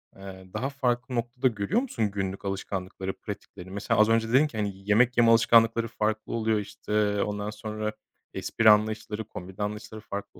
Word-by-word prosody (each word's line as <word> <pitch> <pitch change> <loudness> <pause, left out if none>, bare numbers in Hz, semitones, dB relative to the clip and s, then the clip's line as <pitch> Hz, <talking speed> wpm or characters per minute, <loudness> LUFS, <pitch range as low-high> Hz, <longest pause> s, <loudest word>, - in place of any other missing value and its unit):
eee, 95 -1 -10
daha 120 +6 -2
farklı 125 -2 -1
noktada 120 +2 0
görüyor 125 - 0
musun 115 - -2
günlük 95 0 -4
alışkanlıkları, 95 -1 -4
pratikleri? 90 +1 -9
Mesela, 100 +2 0
az 110 +1 +6
önce 115 0 +2
dedin 135 +6 +5
ki 120 - -9
hani, 105 -1 0 0.2
yemek 120 +4 +4
yeme 115 -1 +6
alışkanlıkları 115 0 +5
farklı 110 -1 -2
oluyor, 110 -1 +1
işte, 105 0 -1
ondan 105 0 -3
sonra 110 0 -4 0.4
espri 115 -1 +2
anlayışları, 110 0 +2
komedi 95 0 -7
anlayışları 105 +1 -5
farklı 100 -1 -7
110 Hz, 160 wpm, -27 LUFS, 100-115 Hz, 0.4 s, az